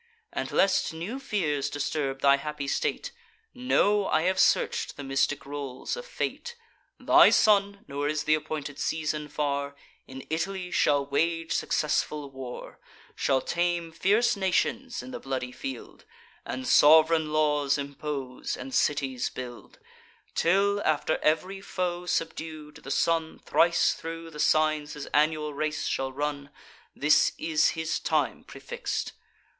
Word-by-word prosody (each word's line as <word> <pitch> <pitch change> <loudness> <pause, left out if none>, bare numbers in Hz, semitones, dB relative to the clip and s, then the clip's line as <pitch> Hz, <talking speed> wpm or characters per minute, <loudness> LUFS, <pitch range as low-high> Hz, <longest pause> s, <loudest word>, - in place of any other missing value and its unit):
And, - - -3
lest 195 -3 +2
new 195 +11 -5
fears 170 - -1
disturb 145 -2 -2
thy 140 0 +5
happy 150 0 -5
state, - - -1 0.4
Know, 210 -5 +2
I 155 +1 +2
have 185 +1 +1
search'd - - +2
the 145 - -6
mystic 135 +1 0
rolls 140 -2 -5
of - - -8
Fate: 480 -1 -4 0.4
Thy - - +7
son 200 -1 +3
(nor 140 +1 -2
is 155 0 -1
th' - - -7
appointed 155 -1 -1
season 150 -1 -2
far) 140 -1 -2 0.3
In 130 0 -9
Italy 180 +2 -2
shall 145 -4 +2
wage 165 +4 0
successful 150 -1 -1
war, 130 -2 -8 0.4
Shall 130 -1 +1
tame 175 0 -1
fierce 205 +9 +2
nations 235 +6 -1
in 260 - -9
the 250 - -6
bloody 130 -2 -4
field, 270 - -8 0.4
And 260 - -5
sov'reign 160 -1 +6
laws 150 -2 +2
impose, 140 -2 -5
and 270 - -8
cities 135 - 0
build, 125 -2 -9 0.6
Till, 200 +4 +2
after 155 0 +1
ev'ry 185 +6 0
foe 180 -2 -3
subdued, 160 -3 -3
the - - -11
sun 160 +3 0
Thrice 170 0 +3
thro' 165 0 -7
the 150 - -10
signs 155 -1 +2
his 145 -1 -7
annual 150 0 +2
race 150 +1 -2
shall 135 0 -1
run: 145 +1 -3 0.5
This 150 +2 +4
is 160 -2 +2
his 160 0 -1
time - - 0
prefix'd. 485 0 -5
155 Hz, 135 wpm, -27 LUFS, 145-180 Hz, 0.6 s, Thy